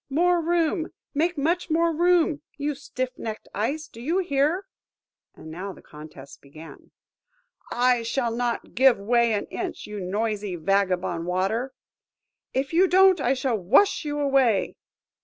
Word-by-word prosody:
more 345 +4 +2
room! 330 0 0 0.3
make 330 +3 0
much 340 +5 0
more 335 +1 +2
room? 340 -3 +2 0.2
You 295 0 -2
stiff 255 -2 -4
necked 220 -1 -6
Ice, 285 +10 -2
do 230 - -13
you 320 +9 0
hear?" 340 +1 0 0.7
And 160 - -11
now 190 +4 -6
the - - -16
contest 150 -2 -13
began.–"I 250 - -5
shall 230 0 -1
not 240 -1 -3
give 260 0 +5
way 235 +3 +2
an 205 - -1
inch, - - -5
you 210 0 -7
noisy 205 +1 -2
vagabond 180 -1 0
Water!" 195 +8 -1 0.8
–"If 270 +3 -2
you 365 +3 +5
don't, 375 0 +5
I 260 +3 +2
shall 255 -4 -1
wash 270 - +3
you 295 -1 -3
away!" 270 -8 +2
260 Hz, 140 wpm, -25 LUFS, 205-325 Hz, 0.8 s, give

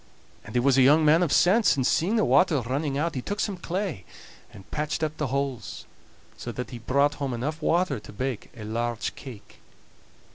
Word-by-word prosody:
And - - -11
he - - +4
was 135 +1 +3
a - - +6
young 150 +4 +5
man 155 +3 +5
of 170 -5 +1
sense, 205 +3 +4
and 130 -2 0
seeing 180 - +2
the 220 - +3
water 145 +4 +4
running 135 +4 -2
out, 165 +2 -1
he 130 - -3
took 205 +10 -4
some 205 -3 -1
clay 180 - -4 0.5
and 95 - -15
patched 150 +1 -2
up 155 0 -1
the 150 - -1
holes, 135 -2 -3 0.5
so - - -6
that 125 -2 -6
he 120 - -7
brought 140 +5 +2
home 135 -3 -1
enough 150 +7 -4
water 175 -2 +1
to - - -13
bake 125 +2 -4
a 110 - -8
large 115 +1 -2
cake. 120 -7 -12
140 Hz, 205 wpm, -26 LUFS, 125-160 Hz, 0.5 s, a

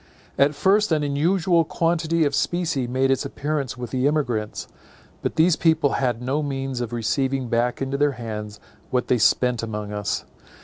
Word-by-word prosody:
At 145 +2 +3
first 195 +7 +3
an 155 -2 +2
unusual 165 +4 +2
quantity 165 0 +1
of 145 - 0
specie 165 -5 0
made 130 +2 +1
its 135 - +1
appearance 145 -4 -3
with 120 -2 -6
the 130 +1 +1
emigrants; 125 -8 -1 0.5
but - - -2
these 165 +1 +4
people 160 -4 +2
had 125 -3 -1
no 135 +4 0
means 135 -3 -3
of 120 -1 -4
receiving 130 +2 -1
back 120 +3 0
into 135 +1 -2
their 145 -1 +3
hands 105 -3 -6 0.3
what 125 -1 -1
they 125 - +3
spent 125 0 +3
among 105 -2 -5
us. 105 +1 -2
135 Hz, 170 wpm, -23 LUFS, 120-155 Hz, 0.5 s, these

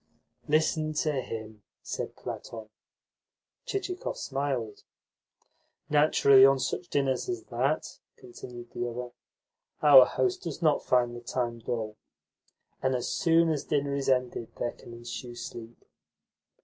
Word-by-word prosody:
"Listen 155 0 +1
to 155 0 0
him!" 110 -3 -7 0.2
said - - -5
Platon. 110 -2 -7 1.0
Chichikov 390 -5 -3
smiled. 135 -6 -3 1.1
"Naturally, 145 -3 +6
on 135 0 +7
such 135 +7 -3
dinners 135 - 0
as 360 - -3
that," - - -1 0.2
continued 125 - -11
the 120 0 -3
other, 120 +1 -6 0.7
"our 135 -4 +9
host 375 0 0
does - - -5
NOT 155 -4 +2
find 120 -1 +2
the 120 - -8
time 120 -1 -3
dull. 110 -2 -4 0.8
And 130 0 +1
as 125 - -2
soon 165 -2 +3
as 150 -3 -1
dinner 140 -1 0
is 140 -1 -1
ended 125 -3 -1
there 120 - -2
can - - -14
ensue 120 +1 -7
sleep." 120 -1 -9
130 Hz, 125 wpm, -28 LUFS, 120-150 Hz, 1.1 s, our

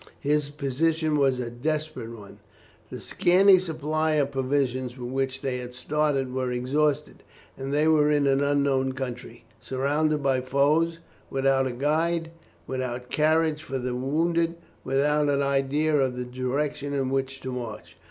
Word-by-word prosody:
His 145 0 0
position 150 +3 0
was 135 -3 +3
a 120 -2 -4
desperate 155 0 -3
one; 105 -4 -11 0.5
the - - -7
scanty 190 +2 +5
supply 155 -2 -1
of 145 -2 +1
provisions 130 -2 -1
with 125 0 -6
which 135 0 -2
they 130 -2 -1
had 125 0 -8
started 140 -1 0
was 130 -1 -1
exhausted, 140 +4 0 0.3
and 135 +1 -5
they 150 +2 +2
were 150 -2 +4
in 145 -1 +2
an 135 0 +3
unknown 140 -2 +1
country, 125 -2 -6 0.2
surrounded 145 +4 0
by 135 -2 +2
foes, 150 +6 +2 0.3
without 135 0 +2
a - - -3
guide, 160 +5 0 0.3
without 125 -1 -4
carriage 155 0 +2
for 135 -3 -4
the 125 -1 -3
wounded, 165 +6 0 0.3
without 145 +2 +2
an 140 0 +2
idea 140 +3 +1
of 130 -3 +1
the 125 - -3
direction 140 +3 -2
in 135 -1 -1
which 135 0 -2
to 130 - -5
march. 120 -4 -7
140 Hz, 150 wpm, -26 LUFS, 130-150 Hz, 0.5 s, scanty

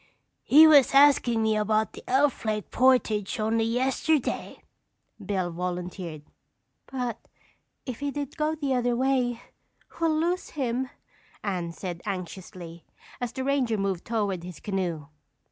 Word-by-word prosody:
"He 310 +3 +7
was 285 -4 +6
askin' 270 -5 +5
me 220 0 +2
about 215 +1 +1
the - - -11
Elf 270 +1 +2
Lake 215 -2 -2
portage 245 -4 +2
only 225 +1 +1
yesterday," 260 +4 0 0.6
Bill 185 -3 -1
volunteered. 180 -2 -5 0.6
"But 245 -4 -3 0.7
if 255 -4 -5
he 285 0 -2
did 285 -1 -5
go 310 0 0
the 285 -4 -1
other 245 -1 +1
way, 250 -2 0 0.6
we'll 320 -2 +2
lose 350 +3 -1
him," 255 -1 -1 0.5
Anne 180 -4 -2
said 175 -1 -6
anxiously, 180 -2 -7 0.4
as 245 -2 -3
the 260 - -4
ranger 260 -5 +1
moved 195 -3 -2
toward 205 -6 -1
his 175 -3 -9
canoe. 180 -7 -3
230 Hz, 130 wpm, -27 LUFS, 190-265 Hz, 0.7 s, He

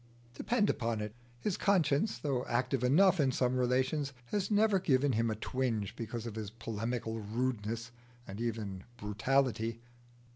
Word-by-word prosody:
Depend 210 - +1
upon 115 - 0
it, 105 0 -4 0.3
his 205 - -1
conscience, 180 -1 +2
though 135 -4 -1
active 125 +1 0
enough 180 +8 +5
in 135 -3 +4
some 125 0 +1
relations, 130 +3 +1 0.2
has 200 -2 0
never 210 -1 +4
given 140 -4 +3
him 115 0 +1
a 110 - -1
twinge 115 -3 -2
because 115 0 -5
of 115 - -4
his 110 -2 -4
polemical 115 +1 -3
rudeness 115 +1 -2 0.4
and 100 +3 -6
even 105 -5 -3
brutality. 115 +2 0
125 Hz, 145 wpm, -33 LUFS, 110-140 Hz, 0.4 s, enough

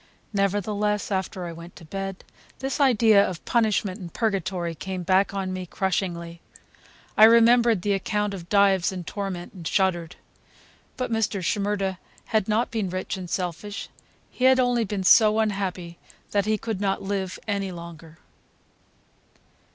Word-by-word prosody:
Nevertheless, 205 +1 0
after 190 -1 -2
I 170 - -5
went 170 +1 -11
to 165 - -13
bed, 195 +3 -5 0.3
this 270 +2 -3
idea 225 -6 +5
of 180 -5 -5
punishment 215 -4 +1
and 175 -3 -8
Purgatory 190 -6 -1
came 185 +3 -5
back 190 +2 +3
on 190 -1 -2
me 185 -1 -5
crushingly. 170 -3 -2 0.7
I 215 - +9
remembered 230 -2 +5
the 205 - +1
account 210 +1 -1
of 175 -3 -8
Dives 195 -3 +3
in 185 -2 -5
torment, 185 -1 -5
and 175 -5 -7
shuddered. 180 -3 0 0.8
But 255 -2 -3
Mr. 215 -4 0
Shimerda 200 -1 -1 0.3
had 215 -3 0
not 220 +3 +1
been 215 -5 -1
rich 185 +1 -3
and 185 -2 -7
selfish; 185 +3 -4 0.4
he 255 - -1
had 260 0 +6
only 245 -2 +2
been 195 -1 -3
so 215 +2 +6
unhappy 190 -5 -2 0.3
that 200 0 +1
he 215 0 +2
could 215 -2 -4
not 195 -1 0
live 195 -2 -3
any 200 -2 -1
longer. 170 -2 -10
195 Hz, 150 wpm, -25 LUFS, 180-215 Hz, 0.8 s, I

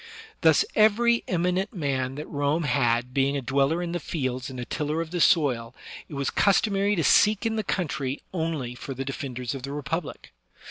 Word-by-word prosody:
Thus 160 -3 +5
every 230 +2 +4
eminent 180 +4 0
man 135 -5 -1
that 150 +2 -6
Rome 145 +3 0
had 125 -3 +1
being 140 +1 +1
a - - -2
dweller 140 +7 +1
in 170 - -4
the 175 - -2
fields 130 -4 -3
and 130 -1 -7
a 120 - -4
tiller 150 +3 -2
of 165 -1 -4
the 175 -1 -1
soil, 125 -9 +2 0.3
it 150 - -8
was 140 -1 -1
customary 200 0 +2
to 165 - 0
seek 210 +8 +4
in 225 -1 0
the 215 - -1
country 150 -8 -2
only 160 -8 -2
for 135 +2 -7
the 135 +1 -4
defenders 130 -2 -4
of 135 - -6
the 135 +2 -6
Republic. 150 +3 -5
150 Hz, 190 wpm, -26 LUFS, 135-175 Hz, 0.3 s, Thus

